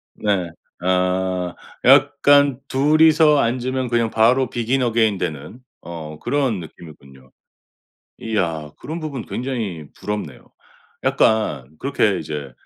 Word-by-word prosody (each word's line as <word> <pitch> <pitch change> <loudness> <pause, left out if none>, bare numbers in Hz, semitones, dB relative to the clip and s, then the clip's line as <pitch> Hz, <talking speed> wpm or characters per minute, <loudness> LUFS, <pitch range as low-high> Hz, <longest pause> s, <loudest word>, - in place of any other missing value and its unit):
네. 95 -5 -1 0.3
아 90 -1 0 0.3
약간 140 -2 +5
2 150 +4 +3
이서 155 -2 +5
앉으면 130 +1 -1
그냥 115 -1 +1
바로 120 +3 +3
Begin 125 +2 -1
Again되는 110 - -1 0.2
어 80 -2 -8
그런 135 -9 0
느낌이군요. 70 -5 -14 0.9
이야. 85 -9 -2
그런 160 +3 -6
부분 140 -7 -5
굉장히 110 - -4
부럽네요. 105 -9 -6 0.5
약간 75 - +1
그렇게 110 -8 +1
이제 75 -3 -6
110 Hz, 250 characters per minute, -20 LUFS, 85-130 Hz, 0.9 s, 약간